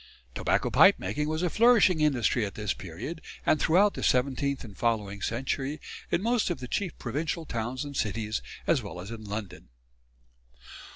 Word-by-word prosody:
Tobacco -, -, 0 dB
pipe -, -, +7 dB
making 150 Hz, +11 st, -2 dB
was 155 Hz, +2 st, -1 dB
a 180 Hz, -, +2 dB
flourishing 215 Hz, -8 st, +5 dB
industry 130 Hz, -5 st, +2 dB
at 100 Hz, -, -4 dB
this 105 Hz, -2 st, -1 dB
period 105 Hz, -, -7 dB, 0.2 s
and 155 Hz, -, +3 dB
throughout 195 Hz, +5 st, +4 dB
the -, -, -6 dB
seventeenth 135 Hz, +2 st, +1 dB
and 105 Hz, -5 st, -11 dB
following 105 Hz, -4 st, -1 dB
century 135 Hz, +6 st, -2 dB, 0.3 s
in 180 Hz, -, 0 dB
most 235 Hz, -2 st, +2 dB
of 175 Hz, -, -2 dB
the 125 Hz, -, -6 dB
chief 185 Hz, -, -2 dB
provincial 155 Hz, +6 st, -3 dB
towns 120 Hz, +2 st, -3 dB
and 140 Hz, -1 st, -7 dB
cities 110 Hz, -2 st, -1 dB, 0.2 s
as -, -, +3 dB
well 90 Hz, -, -8 dB
as 95 Hz, +5 st, -7 dB
in 115 Hz, -1 st, -7 dB
London. 105 Hz, -1 st, -6 dB
130 Hz, 170 wpm, -28 LUFS, 110-160 Hz, 0.3 s, pipe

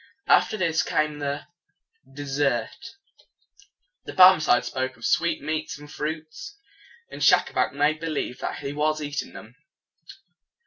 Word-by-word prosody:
After 215 Hz, -, +3 dB
this 165 Hz, -5 st, +1 dB
came 155 Hz, -1 st, -1 dB
the 145 Hz, 0 st, -3 dB, 0.7 s
des 145 Hz, +1 st, -8 dB
sert. 135 Hz, -, -2 dB, 1.1 s
The -, -, -7 dB
Barmecide 185 Hz, -9 st, +6 dB
spoke 130 Hz, -1 st, -3 dB
of 115 Hz, -, -8 dB
sweet 165 Hz, -3 st, +1 dB
meats 155 Hz, 0 st, -3 dB
and 145 Hz, 0 st, -13 dB
fruits; 155 Hz, -, -6 dB, 0.5 s
and -, -, -9 dB
Schacabac -, -, +3 dB
made 145 Hz, +2 st, +1 dB
believe 155 Hz, -6 st, -4 dB
that -, -, -5 dB
he 140 Hz, 0 st, -5 dB
was 155 Hz, +1 st, 0 dB
eating 145 Hz, 0 st, -5 dB
them. 110 Hz, +2 st, -12 dB
150 Hz, 130 wpm, -25 LUFS, 140-155 Hz, 1.1 s, Barmecide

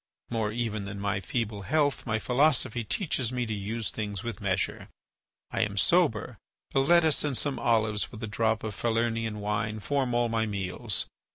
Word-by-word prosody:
More 110 Hz, -2 st, 0 dB
even 110 Hz, -3 st, -2 dB
than 100 Hz, 0 st, -6 dB
my 100 Hz, 0 st, 0 dB
feeble 105 Hz, +1 st, -2 dB
health 145 Hz, +4 st, +1 dB
my 110 Hz, -2 st, +1 dB
philosophy 125 Hz, -1 st, +2 dB
teaches 130 Hz, -, 0 dB
me 125 Hz, -1 st, -1 dB
to 110 Hz, -, -3 dB
use 105 Hz, +2 st, -2 dB
things 105 Hz, -1 st, -4 dB
with 115 Hz, -3 st, -5 dB
measure. 95 Hz, -2 st, -1 dB, 0.6 s
I 115 Hz, -, 0 dB
am 100 Hz, -2 st, -1 dB
sober; 150 Hz, -, +2 dB, 0.3 s
a 135 Hz, -, +4 dB
lettuce 160 Hz, +1 st, +4 dB
and 145 Hz, -4 st, 0 dB
some 140 Hz, -4 st, 0 dB
olives 110 Hz, -3 st, +1 dB
with 110 Hz, -, -9 dB
a -, -, -2 dB
drop 110 Hz, +1 st, 0 dB
of 110 Hz, -1 st, -3 dB
Falernian 115 Hz, -2 st, 0 dB
wine 105 Hz, +1 st, -1 dB
form 130 Hz, +1 st, 0 dB
all 120 Hz, 0 st, +3 dB
my 115 Hz, -1 st, 0 dB
meals. 100 Hz, +1 st, -1 dB
115 Hz, 175 wpm, -28 LUFS, 105-125 Hz, 0.6 s, a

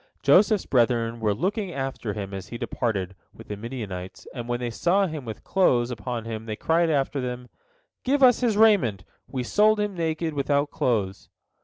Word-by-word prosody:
Joseph's 195 Hz, +8 st, +5 dB
brethren 115 Hz, -2 st, +1 dB
were 110 Hz, -2 st, +1 dB
looking 195 Hz, -, -2 dB
after 135 Hz, -7 st, -4 dB
him 100 Hz, -1 st, -6 dB
as 95 Hz, -1 st, -6 dB
he 120 Hz, -, -7 dB
departed 100 Hz, -7 st, -2 dB, 0.2 s
with -, -, -13 dB
the 105 Hz, -, -3 dB
Midianites, 100 Hz, -5 st, -7 dB
and 120 Hz, -2 st, -6 dB
when 120 Hz, 0 st, -1 dB
they 120 Hz, -1 st, -3 dB
saw 175 Hz, -, +2 dB
him 155 Hz, -6 st, -5 dB
with 110 Hz, -2 st, -7 dB
clothes 125 Hz, -11 st, +2 dB
upon 120 Hz, 0 st, -4 dB
him, 110 Hz, 0 st, -6 dB
they 110 Hz, -, -3 dB
cried 165 Hz, +8 st, +2 dB
after 140 Hz, -2 st, 0 dB
them, 125 Hz, 0 st, -5 dB, 0.5 s
"Give 275 Hz, +1 st, +2 dB
us 250 Hz, -2 st, +6 dB
his 230 Hz, -4 st, +1 dB
raiment! 190 Hz, -, +4 dB, 0.2 s
We 130 Hz, -2 st, -3 dB
sold 210 Hz, -, +3 dB
him 210 Hz, -1 st, -1 dB
naked, 165 Hz, -2 st, -2 dB
without 145 Hz, +1 st, 0 dB
clothes." 100 Hz, -6 st, -1 dB
125 Hz, 180 wpm, -25 LUFS, 115-170 Hz, 0.5 s, us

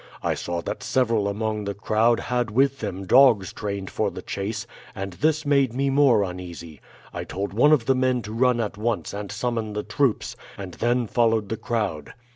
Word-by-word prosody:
I -, -, +1 dB
saw 85 Hz, -1 st, -4 dB
that -, -, -4 dB
several 115 Hz, -5 st, +1 dB
among 105 Hz, +1 st, -2 dB
the 100 Hz, 0 st, -3 dB
crowd 110 Hz, +3 st, +2 dB
had 125 Hz, -2 st, -1 dB
with 135 Hz, +4 st, +2 dB
them 100 Hz, -2 st, -4 dB
dogs 120 Hz, -4 st, +5 dB
trained 100 Hz, -2 st, -4 dB
for -, -, 0 dB
the -, -, -9 dB
chase, 105 Hz, +3 st, -4 dB, 0.3 s
and 95 Hz, -2 st, -5 dB
this 155 Hz, -, 0 dB
made 140 Hz, -4 st, +3 dB
me 135 Hz, +1 st, +1 dB
more 135 Hz, -7 st, +4 dB
uneasy. 90 Hz, -4 st, -7 dB, 0.3 s
I -, -, -4 dB
told 100 Hz, +1 st, -4 dB
one 135 Hz, +8 st, +5 dB
of 140 Hz, -7 st, +4 dB
the 135 Hz, -, +4 dB
men 130 Hz, -2 st, +1 dB
to 105 Hz, +2 st, -7 dB
run 125 Hz, +1 st, +2 dB
at 105 Hz, -2 st, -3 dB
once 115 Hz, 0 st, -2 dB
and 100 Hz, 0 st, -5 dB
summon 110 Hz, 0 st, -2 dB
the 105 Hz, 0 st, -3 dB
troops, 120 Hz, +2 st, 0 dB, 0.2 s
and 95 Hz, -3 st, -7 dB
then 120 Hz, +4 st, +1 dB
followed 115 Hz, -2 st, +1 dB
the 110 Hz, -, -2 dB
crowd. 105 Hz, -12 st, -3 dB
110 Hz, 195 wpm, -24 LUFS, 100-125 Hz, 0.3 s, dogs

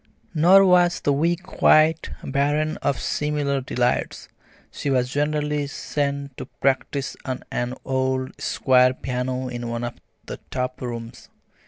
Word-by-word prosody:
Nor 180 Hz, +5 st, +6 dB
was 180 Hz, -1 st, +4 dB
the 145 Hz, -, +1 dB
week 170 Hz, +5 st, 0 dB
quite 160 Hz, -3 st, +3 dB
barren 145 Hz, +3 st, 0 dB
of 140 Hz, -4 st, -1 dB
similar 145 Hz, -2 st, -1 dB
delights. 125 Hz, -1 st, -1 dB, 0.4 s
She 145 Hz, -, -4 dB
was 125 Hz, -2 st, +1 dB
generally 150 Hz, 0 st, 0 dB
sent 140 Hz, -1 st, -3 dB
to -, -, -7 dB
practise 135 Hz, +1 st, -1 dB
on 130 Hz, -1 st, -4 dB
an 120 Hz, +1 st, -2 dB
old 130 Hz, 0 st, -1 dB
square 130 Hz, -1 st, +3 dB
piano 130 Hz, 0 st, -3 dB
in 120 Hz, -1 st, -5 dB
one 115 Hz, 0 st, -3 dB
of 120 Hz, -, -3 dB, 0.3 s
the -, -, -6 dB
top 125 Hz, 0 st, -3 dB
rooms. 115 Hz, -2 st, -7 dB
140 Hz, 135 wpm, -23 LUFS, 125-150 Hz, 0.4 s, Nor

